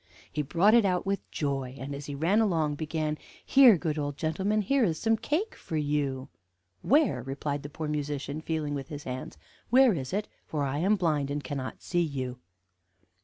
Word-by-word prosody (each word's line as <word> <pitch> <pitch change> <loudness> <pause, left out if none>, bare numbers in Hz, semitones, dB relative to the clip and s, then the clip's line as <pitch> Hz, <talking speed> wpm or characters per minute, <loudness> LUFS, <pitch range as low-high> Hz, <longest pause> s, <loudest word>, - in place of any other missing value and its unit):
He 150 - 0
brought 175 +9 +3
it 235 -1 +6
out 180 -2 +1
with 195 0 -2
joy, 135 -3 -3
and, 140 +2 -6
as 140 +1 -7
he 145 - -4
ran 175 +10 +3
along, 165 -8 +1
began: 155 0 -2 0.3
'Here, 260 -7 +7
good 155 -2 -2
old 145 -1 -3 0.2
man, 210 +2 +2
here 275 +6 +2
is 165 -7 +1
some 225 0 +3
cake 320 - -1
for 160 - -5
you.' 145 -3 -1 0.5
"'Where?' 275 - +3
replied 140 +3 -3
the 145 - -7
poor 155 +1 -5
musician, 150 0 -3
feeling 155 -2 -2
with 135 -2 -4
his 145 -1 -7
hands; 125 -10 -6 0.3
'where 255 -1 +6
is 135 -6 -4
it? 205 +3 -1 0.2
For 150 -2 -2
I 140 +1 -1
am 195 +6 +3
blind, 155 -7 0
and 145 0 -3
cannot 130 0 -5
see 175 -1 +1
you.' 130 -6 -3
150 Hz, 190 wpm, -28 LUFS, 140-190 Hz, 0.5 s, Here